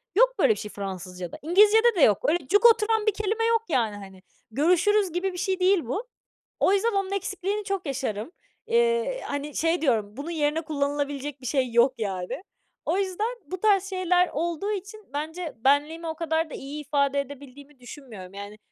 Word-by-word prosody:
Yok - - +5
böyle - - +5
bir - - -8
şey 210 - -7
Fransızcada. 185 -3 -6
İngilizcede 420 +8 +5
de 345 - +1
yok. 210 -7 +6
Öyle 310 -5 0
cuk 410 +4 +3
oturan 445 -1 +5
bir 430 - +4
kelime 430 +2 -1
yok, 460 -1 +2
yani, 235 -8 +1
hani. 190 -2 -11 0.3
"Görüşürüz." 360 - +3
gibi 365 +2 -2
bir 360 - -7
şey 380 0 -1
değil 365 -5 +3
bu. 410 - -3 0.5
O 385 - +4
yüzden 455 +4 +2
onun 390 -1 -1
eksikliğini 395 +1 -2
çok 390 -3 -3
yaşarım. 260 - -3 0.4
Eee, 470 +1 +1
hani, 285 +1 -4
şey 330 +1 +1
diyorum, 220 -6 0
bunun 295 +4 -5
yerine 305 0 0
kullanılabilecek 285 -2 -3
bir - - -11
şey 255 -1 0
yok, 240 +3 +4
yani. 190 - -4 0.4
O 375 - +1
yüzden 395 +2 -1 0.2
bu 365 +5 -6
tarz 405 -3 +4
şeyler 360 -1 +2
olduğu 340 +6 -2
için 410 +1 -6
bence 320 +3 -4
benliğimi 290 +7 +1
o 320 - -3
kadar 320 -1 -1
da - - -10
iyi 290 +2 -6
ifade 280 -1 +1
edebildiğimi 280 0 -9
düşünmüyorum, 235 -8 -11
yani. 200 +1 -8
320 Hz, 180 wpm, -26 LUFS, 270-395 Hz, 0.5 s, yok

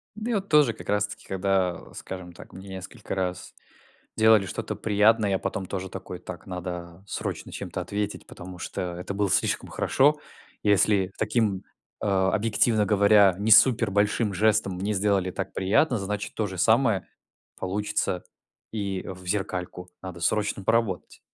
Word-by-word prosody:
У 215 - -10
меня 230 +1 -1
вот 200 0 -2
тоже 150 -7 +5
как - - -11
раз 105 0 +2
таки, - - -11
когда, 95 -2 -1
скажем 90 -2 -8
так, - - -13
мне 95 +1 -10
несколько 95 0 -7
раз 90 -1 -3 0.6
делали 110 -2 +6
что-то - - -4
приятное, 105 0 +3
я 95 - +1
потом 100 -3 -3
тоже 95 0 -5
такой, 95 -1 -7
так, 90 -1 -9
надо 90 -1 -6
срочно - - -4
чем-то - - -5
ответить, 105 0 -4
потому 90 +1 -10
что 90 0 -4
это 90 +3 -5
было 100 -1 0
слишком - - 0
хорошо. 145 +3 +2 0.4
Если 100 -2 +3
таким, 105 -3 0 0.4
а, 95 -2 +2
объективно 110 0 +2
говоря, 100 -1 +5
не 110 +2 +1
супер 115 -1 +6
большим 105 +1 +1
жестом 100 -1 +2
мне 100 +4 -2
сделали 95 -2 +1
так - - -5
приятно, 115 +8 +2
значит 100 +1 -4
то 110 - -1
же 95 -1 -7
самое 110 0 +3 0.5
получится 100 -1 -1 0.5
и 100 -4 -3
в 90 0 -8
зеркальку. 90 -2 -3
Надо 95 -2 -7
срочно 105 +2 0
поработать. 115 -3 0
100 Hz, 155 wpm, -26 LUFS, 95-105 Hz, 0.6 s, делали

